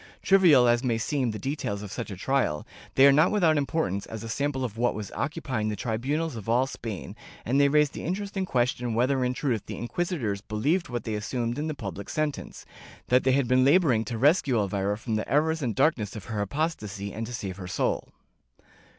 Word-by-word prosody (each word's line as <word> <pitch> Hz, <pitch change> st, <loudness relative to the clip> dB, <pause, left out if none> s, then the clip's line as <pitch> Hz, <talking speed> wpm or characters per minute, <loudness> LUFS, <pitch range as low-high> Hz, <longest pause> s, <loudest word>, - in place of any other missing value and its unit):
Trivial 170 Hz, -11 st, +6 dB
as 120 Hz, +1 st, +3 dB
may 120 Hz, -3 st, +1 dB
seem 130 Hz, +2 st, -1 dB
the 110 Hz, -, -4 dB
details 120 Hz, -6 st, -3 dB
of 100 Hz, -, -8 dB
such 120 Hz, -, -5 dB
a 100 Hz, -, -6 dB
trial, 125 Hz, -, 0 dB, 0.3 s
they 135 Hz, -, +7 dB
are 140 Hz, -, +8 dB
not 155 Hz, +5 st, +5 dB
without 175 Hz, -7 st, +3 dB
importance 135 Hz, -, -1 dB
as 110 Hz, -1 st, -7 dB
a 115 Hz, -, -6 dB
sample 135 Hz, +1 st, -1 dB
of 110 Hz, -4 st, -6 dB
what 120 Hz, +2 st, +1 dB
was 105 Hz, -2 st, -6 dB
occupying 135 Hz, -7 st, -2 dB
the 105 Hz, -, -2 dB
tribunals 130 Hz, +9 st, -2 dB
of 110 Hz, -1 st, -7 dB
all 125 Hz, +3 st, +3 dB
Spain, 115 Hz, -6 st, -6 dB, 0.3 s
and 135 Hz, +5 st, +2 dB
they 140 Hz, -, +6 dB
raise 150 Hz, 0 st, +3 dB
the -, -, -7 dB
interesting 195 Hz, +3 st, -2 dB
question 125 Hz, -6 st, 0 dB
whether 130 Hz, +2 st, +2 dB
in 125 Hz, 0 st, 0 dB
truth 120 Hz, -7 st, -1 dB
the -, -, -6 dB
inquisitors 120 Hz, -, -2 dB
believed 135 Hz, -, -1 dB
what 120 Hz, -1 st, -3 dB
they 110 Hz, -, -3 dB
assumed 120 Hz, +4 st, -2 dB
in 155 Hz, -, -2 dB
the 155 Hz, -, -3 dB
public 100 Hz, -, -6 dB
sentence, 155 Hz, -2 st, -3 dB, 0.4 s
that 125 Hz, +1 st, +4 dB
they 130 Hz, -, +3 dB
had 135 Hz, -2 st, +2 dB
been 130 Hz, +1 st, +4 dB
laboring 140 Hz, -6 st, +4 dB
to 115 Hz, 0 st, -4 dB
rescue 140 Hz, 0 st, +3 dB
Elvira 100 Hz, 0 st, 0 dB
from 110 Hz, -1 st, -2 dB
the 110 Hz, -, -4 dB
errors 160 Hz, +2 st, +2 dB
and 120 Hz, -6 st, -1 dB
darkness 110 Hz, -10 st, +1 dB
of 105 Hz, -, -7 dB
her 110 Hz, -3 st, -3 dB
apostasy 105 Hz, -, -3 dB
and 110 Hz, +1 st, -4 dB
to 125 Hz, -, -7 dB
save 95 Hz, -4 st, -5 dB
her 90 Hz, -2 st, -7 dB
soul. -, -, -1 dB
125 Hz, 210 wpm, -27 LUFS, 110-145 Hz, 0.4 s, are